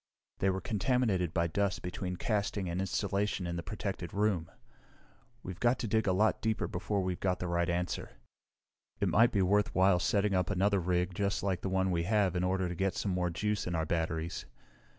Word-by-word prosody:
"They 95 Hz, -, +2 dB
were 95 Hz, 0 st, -1 dB
contaminated 105 Hz, -6 st, +1 dB
by 85 Hz, -1 st, +1 dB
dust 100 Hz, +2 st, -1 dB
between 90 Hz, 0 st, -4 dB
casting 100 Hz, -1 st, -1 dB
and 85 Hz, +2 st, -2 dB
installation 100 Hz, 0 st, -1 dB
in 85 Hz, 0 st, -3 dB
the 85 Hz, -, -3 dB
protected 95 Hz, -2 st, -5 dB
room. 100 Hz, -6 st, +1 dB, 0.9 s
We've 90 Hz, -1 st, -7 dB
got 120 Hz, +1 st, +3 dB
to 115 Hz, -, -3 dB
dig 110 Hz, 0 st, +1 dB
a -, -, +4 dB
lot 105 Hz, +4 st, +2 dB
deeper 110 Hz, -1 st, 0 dB
before 100 Hz, 0 st, -2 dB
we've 90 Hz, -1 st, -2 dB
got 90 Hz, -2 st, 0 dB
the -, -, -4 dB
right 85 Hz, 0 st, 0 dB
answer. 90 Hz, +1 st, -2 dB, 0.9 s
It -, -, +1 dB
might 115 Hz, +4 st, +5 dB
be 100 Hz, -3 st, +2 dB
worthwhile 95 Hz, -1 st, +3 dB
setting 100 Hz, +2 st, +1 dB
up 90 Hz, -1 st, +1 dB
another 100 Hz, 0 st, +2 dB
rig 90 Hz, +1 st, 0 dB
just 100 Hz, +1 st, -1 dB
like 95 Hz, -3 st, 0 dB
the 95 Hz, -, -2 dB
one 95 Hz, 0 st, +1 dB
we 85 Hz, -1 st, +1 dB
have 100 Hz, -2 st, +2 dB
in 90 Hz, -, 0 dB
order 95 Hz, 0 st, +1 dB
to 90 Hz, -, -3 dB
get 95 Hz, +2 st, -1 dB
some 100 Hz, -, -1 dB
more 90 Hz, -1 st, 0 dB
juice 105 Hz, +4 st, -1 dB
in 90 Hz, -, -2 dB
our 80 Hz, -1 st, 0 dB
batteries. 80 Hz, 0 st, -2 dB
95 Hz, 200 wpm, -32 LUFS, 90-100 Hz, 0.9 s, might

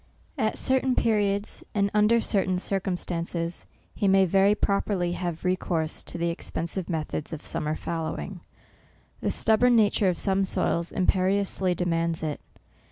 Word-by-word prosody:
At -, -, -1 dB
certain 260 Hz, -1 st, +2 dB
periods, 205 Hz, -2 st, 0 dB
and 200 Hz, -1 st, +1 dB
under 215 Hz, +2 st, +4 dB
certain 190 Hz, -4 st, +1 dB
cir 195 Hz, +1 st, -1 dB
cumstances, 170 Hz, -2 st, -3 dB, 0.3 s
he 200 Hz, -, 0 dB
may 195 Hz, 0 st, +5 dB
very 195 Hz, +3 st, +4 dB
properly 200 Hz, -3 st, 0 dB
have 175 Hz, -1 st, -4 dB
re 180 Hz, 0 st, +3 dB
course 160 Hz, -4 st, -2 dB
to -, -, -3 dB
the 170 Hz, 0 st, 0 dB
expensive 170 Hz, +2 st, -4 dB
method 155 Hz, -2 st, -3 dB
of 160 Hz, -2 st, -7 dB
summer 155 Hz, +1 st, -2 dB
fallowing,. 165 Hz, +4 st, -4 dB, 0.8 s
The -, -, -1 dB
stubborn 240 Hz, +3 st, +3 dB
nature 205 Hz, -3 st, +3 dB
of 175 Hz, -, -1 dB
some 195 Hz, -1 st, +1 dB
soils 170 Hz, -2 st, 0 dB
imperiously 190 Hz, 0 st, +1 dB
demands 165 Hz, -2 st, -1 dB
it. 150 Hz, -2 st, -3 dB
185 Hz, 145 wpm, -26 LUFS, 170-200 Hz, 0.8 s, may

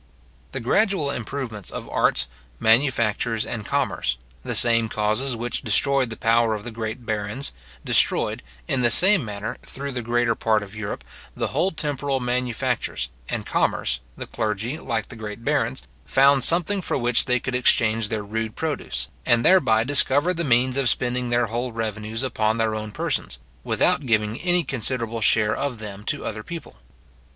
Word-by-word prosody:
The -, -, -4 dB
gradual 175 Hz, -, +1 dB
improvements 115 Hz, -4 st, -5 dB
of -, -, -7 dB
arts, -, -, +2 dB, 0.3 s
manufactures, 115 Hz, -2 st, +2 dB
and 115 Hz, -3 st, -4 dB
commerce, 140 Hz, -, 0 dB, 0.3 s
the -, -, -3 dB
same 115 Hz, -2 st, +3 dB
causes 110 Hz, +5 st, 0 dB
which 120 Hz, +1 st, -2 dB
destroyed 130 Hz, +4 st, +2 dB
the 110 Hz, -, -7 dB
power 115 Hz, -1 st, +3 dB
of 105 Hz, -, -7 dB
the 120 Hz, -, -6 dB
great 115 Hz, +2 st, -5 dB
barons, 110 Hz, +5 st, -3 dB, 0.3 s
destroyed, -, -, +3 dB, 0.3 s
in 130 Hz, -, 0 dB
the 120 Hz, -, +4 dB
same 185 Hz, -, +5 dB
manner, 105 Hz, -1 st, -5 dB
through 140 Hz, +1 st, -6 dB
the 125 Hz, -2 st, -3 dB
greater 120 Hz, 0 st, +1 dB
part 110 Hz, -2 st, +1 dB
of 100 Hz, +1 st, -11 dB
Europe, 105 Hz, -1 st, -5 dB, 0.3 s
the -, -, -2 dB
whole 185 Hz, -, +1 dB
temporal 145 Hz, -4 st, -2 dB
manufactures, 125 Hz, -, -1 dB, 0.2 s
and -, -, -3 dB
commerce, 60 Hz, -1 st, 0 dB, 0.2 s
the -, -, -5 dB
clergy, 110 Hz, +6 st, -2 dB
like 115 Hz, -4 st, -3 dB
the -, -, -9 dB
great 110 Hz, +1 st, -7 dB
barons, 130 Hz, -2 st, 0 dB, 0.2 s
found 135 Hz, -, +4 dB
something 180 Hz, +6 st, +4 dB
for -, -, -1 dB
which 120 Hz, -2 st, +2 dB
they 125 Hz, -1 st, +2 dB
could 125 Hz, -, -4 dB
exchange 115 Hz, -3 st, +2 dB
their 110 Hz, -2 st, -2 dB
rude 110 Hz, +1 st, -3 dB
produce, 65 Hz, -, -3 dB, 0.2 s
and 120 Hz, 0 st, +2 dB
thereby 115 Hz, -13 st, +5 dB
discovered 145 Hz, +5 st, +3 dB
the 170 Hz, -, -1 dB
means 130 Hz, -1 st, +2 dB
of 135 Hz, -3 st, +3 dB
spending 125 Hz, +1 st, 0 dB
their 120 Hz, 0 st, +2 dB
whole 120 Hz, +3 st, -3 dB
revenues 110 Hz, +1 st, -3 dB
upon 110 Hz, -3 st, 0 dB
their 110 Hz, -1 st, +1 dB
own 110 Hz, 0 st, -4 dB
persons, -, -, -2 dB, 0.3 s
without 140 Hz, -2 st, +1 dB
giving 110 Hz, -1 st, +1 dB
any 175 Hz, -1 st, +2 dB
considerable 115 Hz, -3 st, -1 dB
share 110 Hz, 0 st, +3 dB
of 140 Hz, -4 st, -2 dB
them 105 Hz, -2 st, -8 dB
to -, -, -2 dB
other 110 Hz, -1 st, -4 dB
people. 165 Hz, -, -8 dB
115 Hz, 165 wpm, -24 LUFS, 110-135 Hz, 0.3 s, same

